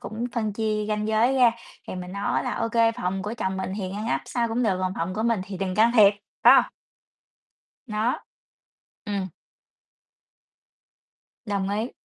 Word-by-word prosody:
cũng 225 +3 -5
phân 220 -4 -1
chia 215 0 -1
ranh 210 0 -1
giới 225 +4 +3
ra, 250 -3 +6 0.4
thì - - -4
mình 180 0 -7
nói 200 +1 -1
là - - -2
"Ô 230 - -1
kê, 230 0 +3
phòng 190 -2 -3
của 210 +3 -4
chồng 190 -4 -2
mình 190 0 -3
thì 195 -3 -3
ngăn 210 +2 -5
nắp - - 0
sao 235 -2 -1
cũng 230 +2 -1
được, 195 -6 +1
còn 185 0 -1
phòng 170 +3 -2
của 220 - -2
mình 230 -3 +1
thì 195 0 -7
đừng 190 -1 -2
can 225 +3 +4
thiệp", 205 -4 +7 0.3
phải - - +9
hông? - - +4 1.2
Nó. 220 +2 0 0.9
Ừm. 200 -2 -2 2.2
Đồng 200 -2 -1
ý. 215 +5 -2
210 Hz, 180 wpm, -25 LUFS, 195-230 Hz, 2.2 s, phải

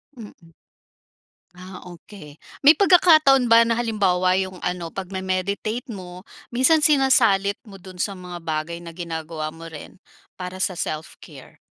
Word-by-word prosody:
Mm. 225 -4 -11 1.3
Ah, 185 0 -11
okey. 170 -3 -14 0.2
May 295 +3 +6
pagkakataon 310 - +5
ba 230 0 +6
na, 230 - 0
halimbawa 190 -6 +1
yung 185 -1 -4
ano, 180 -2 -4
pagme-meditate 195 +6 -4
mo, 180 -4 -9 0.3
minsan 295 +5 +3
sinasalit 230 -9 +3
mo 195 -3 -14
dun 185 -1 -13
sa 200 +3 -2
mga 180 -2 -9
bagay 160 +1 -3
na 170 -1 -11
ginagawa 160 -2 -6
mo 165 +1 -12
rin 160 +1 -11 0.4
para 185 0 -7
sa 185 -2 -1
self 155 -1 -5
care? - - -15
185 Hz, 140 wpm, -22 LUFS, 175-230 Hz, 1.3 s, May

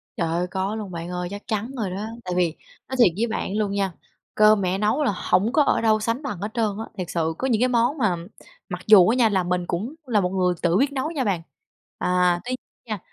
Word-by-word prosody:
Trời 170 - -1
ơi, 170 +2 -1
có 190 +3 -2
luôn 210 -4 -6
bạn 170 0 -6
ơi, 180 0 -3
chắc 205 +1 -8
chắn 220 +2 -2
rồi 215 -5 -1
đó. 200 +4 -4 0.2
Tại 180 - -2
vì 175 -3 +1 0.3
nói 260 - -3
thiệt 240 - +7
với 230 +3 +1
bạn 215 -2 -3
luôn 210 -2 0
nha, 195 -2 -1 0.4
cơm 215 -1 +5
mẹ 185 0 0
nấu 215 +9 +1
là 260 - +2
hổng 200 +4 +1
có 300 - +5
ở - - +2
đâu 220 -1 +3
sánh 230 +5 -1
bằng 230 -10 -4
hết 205 +2 -3
trơn 230 -2 +1
á, 225 - -4
thiệt 180 -2 -4
sự 165 -2 -1
có 265 - -1
những 230 -3 +1
cái 250 - +4
món 240 +4 +2
mà 215 -9 +2 0.5
mặc 180 -1 -5
dù 200 -5 +8
á 230 - +3
nha 240 -3 +4
là 190 -3 +1
mình 180 0 -1
cũng 215 - -3
là 225 -5 +2
một 180 - 0
người 180 -1 +1
tự 175 0 +2
biết 275 +4 +2
nấu 280 +3 -2
nha 290 -6 -1
bạn. 195 -7 0 0.6
À, 180 -1 +2
tuy 255 +1 -2 0.3
nha, 215 -3 -4
205 Hz, 255 wpm, -23 LUFS, 180-230 Hz, 0.6 s, dù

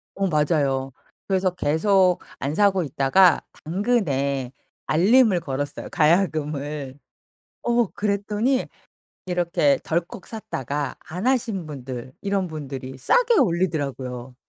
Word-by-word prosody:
어 195 0 0
맞아요. 145 -4 +1 0.4
그래서 190 -1 +1
계속 180 +3 +2 0.2
안 140 +3 -2
사고 195 -2 +3
있다가 150 +5 +4 0.2
당근에 145 - 0 0.4
알림을 200 +3 +4
걸었어요 145 -1 -4
가야금을. 150 -4 0 0.6
어 240 -2 +2
그랬더니 210 +6 -1 0.6
이렇게 170 -6 +1
덜컥 170 +3 -3
샀다가 145 - -4
안 180 +8 -4
하신 230 -9 0
분들 130 -4 -7
이런 200 -2 0
분들이 135 -4 -7
싸게 475 - +3
올리더라고요. 140 - -1
165 Hz, 250 characters per minute, -23 LUFS, 140-195 Hz, 0.6 s, 있다가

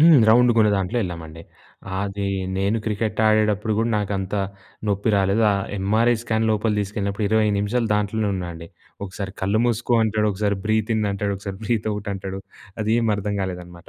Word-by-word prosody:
హ్మ్. 160 -2 +8
రౌండ్‌గా 120 0 +5
ఉన్న 105 - +4
దాంట్లో 95 +6 -1
ఎళ్ళామండి. 80 -2 -7 0.6
అది 100 0 -3 0.3
నేను 100 +3 +1
క్రికెట్ 110 0 -1
ఆడేటప్పుడు 110 0 +2
కూడా 115 +1 +1
నాకు 105 -1 -1
అంత 95 +1 -4 0.5
నొప్పి 100 +2 +1
రాలేదు. 100 +3 +2
ఆ - - +1 0.2
ఎంఆర్ఐ 110 +5 +3
స్కాన్ 110 -1 0
లోపలకి 105 0 +1
తీసుకెళ్ళినప్పుడు 100 +1 -2
20 110 0 +3
నిమిషాలు 110 +3 0
దాంట్లోనే 105 +1 0
ఉన్నానండి. 85 -2 -6 0.4
ఒకసారి 95 +1 -6
కళ్ళు 100 +4 +2
మూసుకో 120 +1 0
అంటాడు. 105 -1 +1
ఒకసారి 100 0 -1
బ్రీత్ 110 +1 +1
ఇన్ 110 - 0
అంటాడు. 100 0 -2
ఒకసారి 100 -1 -7
బ్రీత్ 110 0 0
ఔట్ 105 0 -5
అంటాడు. 95 0 -6 0.4
అదేమీ 110 0 +2
అర్థం 100 0 -3
కాలేదనమాట. 90 -1 -7
105 Hz, 165 wpm, -22 LUFS, 95-110 Hz, 0.6 s, హ్మ్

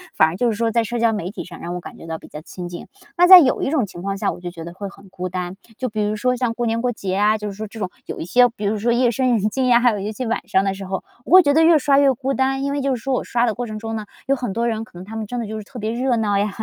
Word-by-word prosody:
反 160 - +5
而 160 - -4
就 245 -1 +2
是 - - -3
说 230 -1 +1
在 230 0 +2
社 235 +2 -3
交 230 -1 +3
媒 185 -4 -3
体 - - -6
上 175 -2 -11
让 175 +1 -5
我 180 - -3
感 - - -11
觉 165 - -11
到 160 0 -4
比 - - -14
较 150 - -9
亲 175 +2 -8
近。 175 0 -8 0.3
那 355 - +6
在 370 0 +12
有 270 -6 +2
一 - - 0
种 275 -7 +1
情 175 -2 -10
况 195 +1 -3
下， - - 0
我 - - -9
就 175 0 -6
觉 165 -2 -9
得 170 +1 -8
会 200 +1 -6
很 195 -1 -17
孤 185 -1 -5
单， 180 0 -4 0.2
就 255 -2 -2
比 215 0 -3
如 210 +1 -1
说 250 +4 +1
像 240 -2 -1
过 240 0 -2
年 230 0 0
过 250 - 0
节 190 -5 -4
啊， 210 +1 +3
就 210 - -5
是 - - -7
说 215 +2 -6
这 220 +2 -11
种 190 - -2 0.2
有 - - -6
一 - - -4
些 245 +8 +5
比 210 -3 -7
如 215 +2 0
说 230 +3 +1
夜 240 0 +3
深 255 +2 +1
人 210 +1 0
静 260 +2 0
呀， 240 -1 +6
还 245 0 +4
有 210 - -3
一 205 +2 -3
些 250 +4 -5
晚 230 - -2
上 190 - +2
的 195 -1 0
时 195 0 -8
候， 190 0 -4 0.2
我 - - -8
会 370 -1 +9
觉 285 -1 +3
得 320 +1 +5
越 330 -1 +6
刷 280 -1 +3
越 275 -2 +4
孤 270 +2 -2
单。 265 0 0
因 280 - -1
为 285 - -1
就 270 -1 0
是 230 - -8
说 270 -1 -1
我 - - 0
刷 240 0 +1
的 225 - 0
过 245 +3 -4
程 215 0 -6
中 225 0 -4
呢， 215 - -5 0.2
有 275 - +3
很 245 -6 -4
多 235 +2 0
人 220 -1 -2
可 200 - -14
能 180 - -8
他 220 +3 -9
们 220 - -3
真 245 +3 -4
的 230 - -4
就 220 +1 -5
是 215 - -6
特 245 +2 -10
别 215 +1 -2
热 245 +1 0
闹 205 -3 +1
呀， 205 +1 +1
225 Hz, 395 characters per minute, -21 LUFS, 195-250 Hz, 0.3 s, 在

